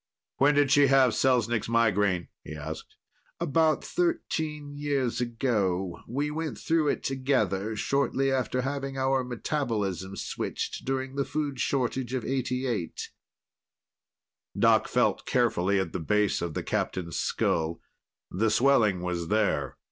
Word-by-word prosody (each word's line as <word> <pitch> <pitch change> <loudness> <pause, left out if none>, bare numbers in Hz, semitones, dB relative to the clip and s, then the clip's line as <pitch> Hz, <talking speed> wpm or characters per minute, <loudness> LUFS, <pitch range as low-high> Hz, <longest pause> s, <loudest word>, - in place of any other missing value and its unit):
"When 145 +2 +4
did 145 -2 +3
she 145 -1 +6
have 135 -2 +5
Selznik's 120 -4 +1
migraine?" 105 -6 +2
he 75 - -8
asked. 80 +1 -7 0.4
"About 160 -1 +2
thirteen 160 - -2
years 140 -5 -1
ago. 105 -7 -1
We 145 +5 -2
went 160 0 -3
through 160 -2 +1
it - - 0
together, 110 -6 0
shortly 135 +3 +1
after 130 -1 0
having 135 0 -3
our 130 0 +1
metabolism 110 - -2
switched - - -4
during 135 0 -2
the 140 - +2
food 145 -2 -3
shortage 130 -1 -1
of 125 - -3
'88." 125 -7 -2 1.5
Doc - - +4
felt - - +1
carefully 100 -6 +2
at 95 -4 -3
the - - -2
base 105 +4 +1
of 85 -3 -3
the - - -2
Captain's 85 -3 -2
skull; 80 0 0 0.5
the 110 +5 +1
swelling 110 -6 +3
was 90 -2 -2
there. 105 +1 0
125 Hz, 130 wpm, -28 LUFS, 100-140 Hz, 1.5 s, she